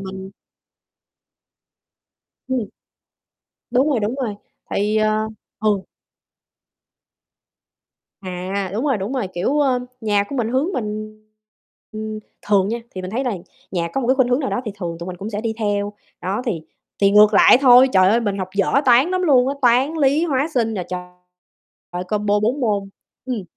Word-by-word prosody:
mình 190 0 -7 2.2
Ừm. 260 -1 0 1.1
Đúng 260 +4 +3
rồi, 265 -6 +1
đúng 215 +4 -1
rồi, 250 -7 -3 0.3
tại - - -1
vì, 210 +1 +1
à 215 0 +2 0.3
ừ. 205 -2 +1 2.4
À, 185 +1 -4
đúng 225 +6 -2
rồi, 275 -5 +2
đúng 200 +6 -4
rồi. 250 -8 -2
Kiểu, 265 +12 0
ơ, 260 -3 +2 0.2
nhà 205 -2 +1
của 280 - -5
mình 230 -3 0
hướng 270 +10 0
mình 215 -3 -4 0.8
ừm, 215 0 -5 0.2
thường 200 -1 +2
nha, 235 +2 -2 0.2
thì 185 - -5
mình 185 - -5
thấy 250 +6 -2
là 250 - 0 0.4
nhà 170 -2 -1
có 270 - -1
một 240 - -2
cái 260 - +5
khuynh 260 -2 +2
hướng 250 +4 +2
nào 265 - -2
đó - - -1
thì 215 - -4
thường 170 -3 -4
tụi 170 - -7
mình 185 -1 -6
cũng 200 +4 -6
sẽ 210 -1 -3
đi 225 -1 -2
theo. 205 -1 -1 0.3
Đó, 195 +6 -2
thì 175 -9 -2 0.4
thì 200 - +5
ngược 210 +1 +6
lại 220 - +7
thôi. 255 -1 +7
Trời 185 -1 +5
ơi! 225 +4 +3
Mình 205 -3 -2
học 185 -1 -3
dở 200 -2 +1
Toán 255 +4 +5
lắm 370 0 0
luôn 260 -6 +4
á, 275 - -1
Toán, 255 +5 +3
Lý, 285 +2 +3
Hóa, 285 -2 0
Sinh 225 -3 +1
nè 185 - -2
trời, 180 0 -10
combo 210 -1 +1
4 240 +7 0
môn. 205 -5 0 0.4
Ừm. 245 -5 -3
215 Hz, 180 wpm, -20 LUFS, 195-255 Hz, 2.4 s, lại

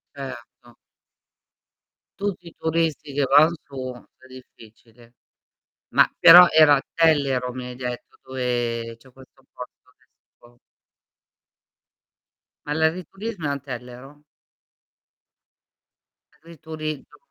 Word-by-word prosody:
Erto. 125 -3 -11 1.4
Tutti 195 -4 -4
i 165 - -14
turisti 160 -3 -2
che 145 0 0
van 150 +5 +5
su 130 -2 -7 0.3
è 130 - -21
difficile. 120 -2 -18 0.8
Ma - - +4
però 175 +2 +10
era 155 -2 +6
a 135 - -1
Tellero 140 -6 +1
mi 125 -1 -7
hai 125 - -9
detto, 125 -1 -7
dove 120 -3 -3
c'è 130 +2 -21
questo 130 +1 -20
posto 125 - -13
adesso. 120 0 -27 2.1
Ma 145 - -3
l'agriturismo 180 +5 -3
è - - -1
a 140 0 -3
Tellero? 125 +2 -10 2.1
L'agriturismo 155 -2 -9
135 Hz, 95 wpm, -22 LUFS, 125-160 Hz, 2.1 s, però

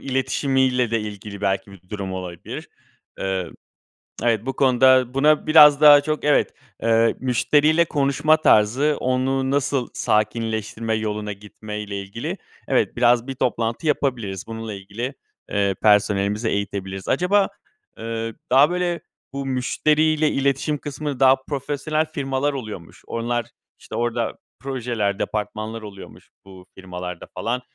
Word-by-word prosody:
iletişimiyle 130 -2 0
de 115 -1 +1
ilgili 105 -1 -7
belki 100 0 -1
bir 90 -2 -17
durum 100 -2 -5
olabilir. 90 -2 -7 0.5
Eee, 95 -3 -2 0.7
evet, 115 -2 +1
bu 135 - -2
konuda 130 -1 +4
buna 150 +3 +3
biraz 150 -2 +8
daha 145 -1 +9
çok 155 +1 -3
evet, 150 0 +2 0.3
eee, 115 0 +3
müşteriyle 150 +6 +3
konuşma 150 +1 +2
tarzı, 135 +3 +3
onu 130 +1 0
nasıl 140 -2 0
sakinleştirme 110 +1 -1
yoluna 105 -1 -3
gitme 105 +1 -9
ile 100 -1 -5
ilgili, 100 +4 -5 0.3
evet, - - +1
biraz 120 0 +3
bir 135 - -5
toplantı 115 +4 -1
yapabiliriz, 115 -10 -1
bununla 115 -1 -6
ilgili, 100 +7 -6 0.4
eee, 100 -2 +1
personelimizi 105 +1 +2
eğitebiliriz. 95 -2 -4
Acaba, 195 +2 +2 0.5
eee, 115 0 -4 0.2
daha 135 +4 +6
böyle, 175 -1 -1 0.3
bu 140 0 -4
müşteriyle 150 +4 +1
iletişim 140 +2 0
kısmı, 145 -1 -5
daha 135 0 +6
profesyonel 145 +2 -1
firmalar 140 -2 -2
oluyormuş. 110 -10 -8
Onlar, 120 0 -2 0.3
işte - - -9
orada 120 -1 -1 0.2
projeler, 120 -7 -2
departmanlar 110 +1 -4
oluyormuş 100 -2 -12 0.2
bu 95 -2 -14
firmalarda 90 -2 -7
falan. 125 +2 -2
120 Hz, 125 wpm, -22 LUFS, 105-140 Hz, 0.7 s, daha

